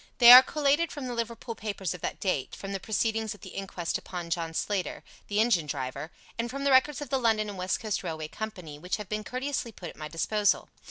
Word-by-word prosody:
They 240 -1 +10
are 250 +1 +14
collated 295 +4 +1
from 285 -3 -6
the 250 - -3
Liverpool 235 0 -4
papers 200 -5 -4
of 180 - -10
that - - -3
date, 180 -9 -1
from 195 - -7
the 195 - -2
proceedings 220 +1 -1
at 200 - -19
the - - -9
inquest 185 -3 -3
upon 175 -2 -7
John 165 -1 -2
Slater, 200 0 -2 0.2
the 205 0 0
engine 210 -9 +3
driver, 135 +2 -4 0.3
and 235 +1 -1
from 275 +2 -5
the 280 - +3
records 265 +3 +4
of 290 - -7
the 270 - +2
London 220 -3 +2
and 205 - -6
West 185 +1 0
Coast 215 -3 -2
Railway 160 -3 -4
Company, 180 -7 -7
which 180 +6 -2
have 210 -3 -8
been 215 0 -2
courteously 255 0 -3
put 175 -4 -8
at - - -12
my 155 0 -6
disposal. 205 +6 +1
210 Hz, 230 wpm, -28 LUFS, 175-240 Hz, 0.3 s, are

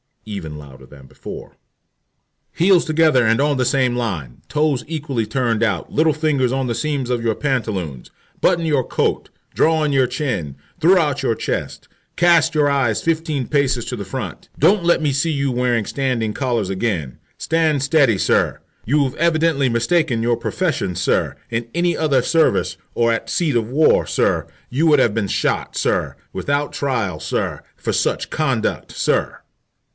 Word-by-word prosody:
(Even 95 -8 -6
louder 65 -3 -13
than 70 0 -15
before.) - - -10 1.0
"Heels 180 0 +4
together 155 -6 +3
and 115 +2 +3
on 145 -1 +1
the 130 - +1
same 125 -1 +1
line, 90 - -4
toes 150 -4 0
equally 145 -7 -2
turned 115 -1 0
out, 115 -3 -1
little 155 0 +3
fingers 145 -5 +1
on 135 -1 -1
the 120 - -1
seams 135 +1 -2
of 120 -2 0
your 115 -2 +1
pantaloons, 105 - -3 0.3
button 170 -2 +2
your 145 -5 +2
coat, - - -1 0.2
draw 160 0 +2
in 150 - +1
your 135 -2 +3
chin, 120 - -3 0.2
throw 180 +4 +5
out 145 -4 0
your 120 -4 0
chest, - - -4 0.3
cast 170 -2 +4
your 150 -1 +3
eyes 135 -6 +1
fifteen 155 -5 -1
paces 135 -5 +1
to 125 - -4
the 100 -4 -6
front, 95 - -6
don't 200 -2 +3
let 170 -1 +3
me 150 -2 +1
see 145 +5 0
you 140 -2 0
wearing 120 -3 0
standing 125 -5 -1
collars 120 -7 -1
again. 95 - -2 0.2
Stand 160 -3 +1
steady, 135 -7 +3
sir. - - +1 0.3
You've 140 +1 +1
evidently 160 -4 +2
mistaken 115 0 +1
your 120 0 +1
profession, 155 - -2
sir. 90 - 0
In 115 0 -3
any 175 0 +1
other 145 -5 +2
service, 165 +5 +1 0.2
or 115 0 +2
at 115 - -2
the - - -6
seat 160 -7 0
of 115 -1 0
war, 150 +5 +3
sir, - - 0 0.2
you 150 +6 +1
would 150 -3 +5
have 120 -5 +3
been 110 -2 -1
shot, - - -1
sir, - - 0 0.2
without 145 +1 -1
trial, 115 - -2
sir, - - -3
for - - -3
such - - 0
conduct, 135 -8 -1
sir." - - -1
130 Hz, 170 wpm, -20 LUFS, 115-155 Hz, 1.0 s, throw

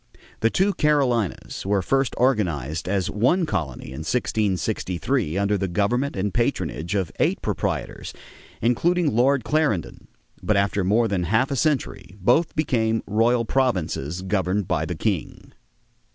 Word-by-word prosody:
The 115 - +3
two 195 - +2
Carolinas 130 - 0
were 100 -1 +1
first 135 +5 +1
organized 85 - 0
as 95 -1 0
one 135 - +2
colony 75 - -3
in 65 - -7
1663 100 - -1
under 100 0 +1
the 95 - -1
government 115 +9 0
and 95 +1 -2
patronage 105 - -1
of 95 -4 -1
eight - - +2
proprietors, - - -3 0.5
including 160 +5 +2
Lord 130 +2 +3
Clarendon; 115 - -1 0.3
but 110 - +1
after 100 0 +1
more 110 +5 +3
than 95 -4 -1
half 115 - +1
a - - 0
century 135 - -1
both 125 - +2
became 115 -7 +1
royal 115 +3 +2
provinces 90 - -1
governed 95 0 0
by 80 -5 0
the 90 - -4
king. 95 -1 -3
105 Hz, 140 wpm, -23 LUFS, 95-125 Hz, 0.5 s, The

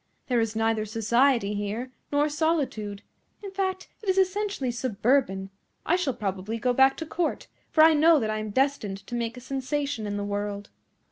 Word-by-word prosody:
There 245 -2 +3
is 225 -1 -1
neither 225 -1 +1
society 225 +1 +2
here, 210 +5 -3 0.2
nor 290 +1 +3
solitude. 290 -10 -1 0.4
In 395 - -6
fact, 380 -1 -2
it 415 - -4
is 375 - +2
essentially 385 -7 +1
suburban. 235 -4 0 0.3
I 345 - +3
shall 315 -9 -1
probably 195 +2 -3
go 250 +2 +1
back 265 +1 +5
to 325 - -4
Court, 325 +1 -2 0.2
for 310 - +5
I 320 0 +7
know 315 +1 +5
that 215 -3 -1
I 215 - -2
am 215 0 -4
destined 210 -6 0
to - - -10
make 235 0 -2
a - - -8
sensation 270 -2 -2
in 205 0 -3
the 205 - -2
world." 205 0 -4
245 Hz, 185 wpm, -26 LUFS, 215-300 Hz, 0.4 s, I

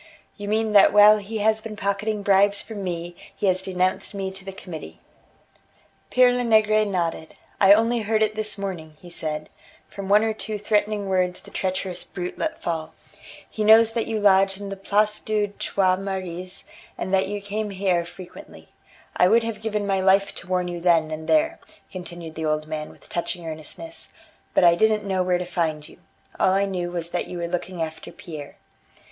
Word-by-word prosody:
"You 205 -1 -7
mean 220 +1 0
that 205 -1 +7
while 210 +1 +8
he 210 +2 -5
has 220 0 +3
been 220 -1 -7
pocketing 205 +1 -2
bribes 200 0 +4
from 210 -3 -7
me, 175 -1 -4 0.2
he - - -3
has 185 -1 +2
denounced 185 +1 -1
me 190 -1 -3
to 190 0 -7
the 195 - -6
Committee." 180 -4 -9 1.1
Pere 250 -1 +5
Lenegre 215 -3 +3
nodded: 170 -5 -3 0.2
"I 195 0 +8
only 230 +3 +2
heard 220 0 +1
it 215 0 0
this 215 -1 0
morning," 170 -6 -6
he 175 - -13
said, 155 -2 -4 0.4
"from 195 -1 -8
one 210 +2 +5
or 220 0 0
two 215 0 -5
threatening 205 0 0
words 185 -1 0
the - - -15
treacherous 185 -1 -2
brute 180 -1 -6
let 320 0 -3
fall. 160 -1 -3 0.5
He 215 - -4
knows 220 +1 +6
that 230 -1 -1
you 225 -1 -1
lodge 195 -1 +4
in 200 -1 -6
the 195 - -4
Place 210 +2 +1
des 210 -1 -1
Trois 185 -2 +1
Maries, 185 -1 -5 0.3
and 185 - -4
that 190 0 +3
you 205 +1 -3
come 205 +1 -4
here 190 -3 0
frequently. 180 - -12 0.5
I 180 - +5
would 230 +4 +4
have 225 -2 -4
given 210 -2 -2
my 195 -1 +1
life 195 +1 +3
to - - -9
warn 180 -1 0
you 175 -1 -5
then 165 -3 +3
and 155 0 -6
there," 320 +2 +2 0.3
continued 175 -3 -8
the 160 0 -4
old 155 0 0
man 155 -1 -5
with - - -17
touching 170 0 -4
earnestness, 160 - -8 0.5
"but - - +4
I 170 -1 +7
didn't 215 +3 +2
know 190 -2 0
where 180 -1 +2
to 180 - -4
find 160 -4 -2
you. - - -17 0.4
All 185 - +4
I 195 +1 +2
knew 180 -3 -3
was 170 -1 -5
that - - -2
you 180 - -6
were 170 0 -3
looking 175 0 -3
after 160 0 -7
Pierre." 155 -6 -9
195 Hz, 195 wpm, -24 LUFS, 175-210 Hz, 1.1 s, while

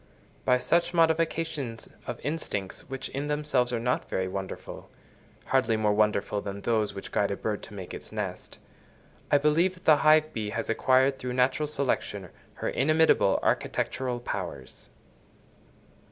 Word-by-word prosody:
By 125 - +5
such 170 +8 +1
modifications 160 -7 0 0.2
of - - -4
instincts 130 -10 -4
which 135 0 -5
in 140 +2 -3
themselves 145 -4 +1
are 120 - 0
not 125 +2 -1
very 95 0 -1
wonderful—hardly 110 +5 -4
more 105 -1 +2
wonderful 105 -1 +1
than 100 0 -6
those 110 -3 0
which 100 - -7
guide 100 - +1
a 100 - -2
bird 105 -2 -2
to 105 - -11
make 95 -3 -7
its - - -9
nest—I 145 - -5
believe 160 +6 +2
that 180 - -19
the 155 -2 +7
hive 155 +1 +4
bee 110 -2 -3
has 115 +1 -2
acquired, 130 +3 +3
through 125 0 -4
natural 130 +4 +2
selection, 140 -3 -2 0.3
her - - -2
inimitable 155 -8 +3
architectural 125 -2 -1
powers. 120 - -6
125 Hz, 140 wpm, -28 LUFS, 110-150 Hz, 0.3 s, the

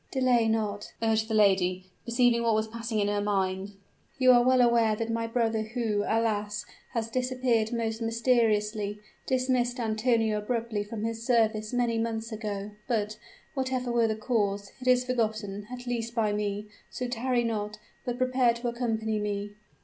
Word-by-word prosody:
"Delay 250 -4 +3
not," 210 -2 -1
urged 220 -1 +2
the 220 - -1
lady, 185 -3 +2
perceiving 235 0 +3
what 230 -2 +2
was 215 0 0
passing 230 0 -4
in 205 - +2
her 205 0 0
mind. 195 -1 -1 0.4
"You 255 -1 +6
are 245 -1 +7
well 255 +1 +4
aware 235 -3 +4
that 230 +1 -3
my 230 0 -1
brother, 225 -1 +1
who, 220 -2 -1
alas! 210 -2 0 0.3
has 230 -2 -2
disappeared 250 -3 +1
most 230 -1 -2
mysteriously, 220 -3 +1 0.3
dismissed 255 -1 +1
Antonio 225 -1 +1
abruptly 225 -1 -2
from 215 +1 -6
his 225 0 -3
service 220 -3 +2
many 240 -2 +1
months 225 0 -2
ago; 210 -2 -4 0.2
but, 215 -2 -1 0.3
whatever 260 -2 -1
were 235 -1 +3
the 220 - 0
cause, 205 -3 -1
it 255 - -6
is 250 0 +4
forgotten, 215 -5 -2
at 250 0 -7
least 235 -1 -3
by 215 -3 +1
me. 205 0 -2 0.2
So 250 - -4
tarry 245 0 0
not, 215 -2 -2 0.3
but 245 -1 -3
prepare 255 -2 +3
to 240 +1 -2
accompany 225 -3 -1
me." 205 0 -3
225 Hz, 165 wpm, -28 LUFS, 210-240 Hz, 0.4 s, are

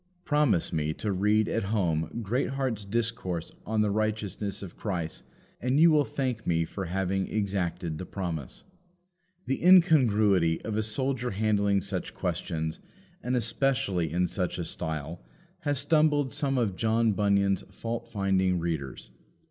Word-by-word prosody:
Promise 145 - +2
me 80 -1 0
to 105 - -2
read 105 +3 +2
at 115 - -1
home 90 -2 -1
Greatheart's 125 0 -1
discourse 110 -6 -2 0.2
on 110 -1 +1
the 105 -1 +2
Righteousness 105 -2 -2
of 90 - -9
Christ, 85 -6 -4 0.4
and 130 +4 +1
you 165 +1 +7
will 150 -2 +4
thank 125 -5 -3
me 85 -1 +2
for 95 +3 -5
having 95 +2 -1
exacted 90 -6 -2
the 95 - -5
promise. 85 -8 -5 0.8
The 135 - -2
incongruity 110 - +5
of 110 - -3
a 110 - +1
soldier 125 +3 -1
handling 100 -1 +1
such - - -4
questions, 80 -3 -3 0.4
and 125 +1 -1
especially 110 - 0
in 90 +2 +1
such 90 0 -2
a 85 - -3
style, 80 -1 -4 0.4
has 145 -1 -1
stumbled 145 -1 +2
some 135 -2 0
of 110 -7 0
John 115 +2 +2
Bunyan's 100 -1 +2
fault 115 0 -5
finding 95 -2 +1
readers. 80 -5 -4
100 Hz, 140 wpm, -28 LUFS, 90-120 Hz, 0.8 s, you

